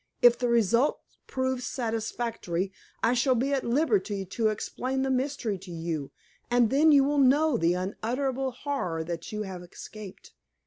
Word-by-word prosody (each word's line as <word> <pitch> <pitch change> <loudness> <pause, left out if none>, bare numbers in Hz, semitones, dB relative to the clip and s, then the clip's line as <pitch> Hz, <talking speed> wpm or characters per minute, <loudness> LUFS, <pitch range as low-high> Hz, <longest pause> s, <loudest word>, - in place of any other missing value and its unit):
"If 240 -1 +7
the 245 - +1
result 235 +4 +3 0.3
proves 260 -1 -1
satisfactory, 225 -6 -2 0.3
I 230 - +4
shall 255 +1 +3
be 265 +4 0
at 270 - 0
liberty 240 - +1
to 220 +4 0
explain 255 +5 -2
the 270 - 0
mystery 255 -6 -1
to 185 0 -11
you, 165 -4 -4 0.4
and 240 -2 +3
then 305 +4 +5
you 280 -2 +6
will 290 +1 +1
know 285 +2 +4
the 175 -5 +2
unutterable 250 +8 -2
horror 250 - -3
that 170 0 -5
you 215 0 -3
have 190 -3 -7
escaped. 195 +3 -11
235 Hz, 160 wpm, -28 LUFS, 195-265 Hz, 0.4 s, If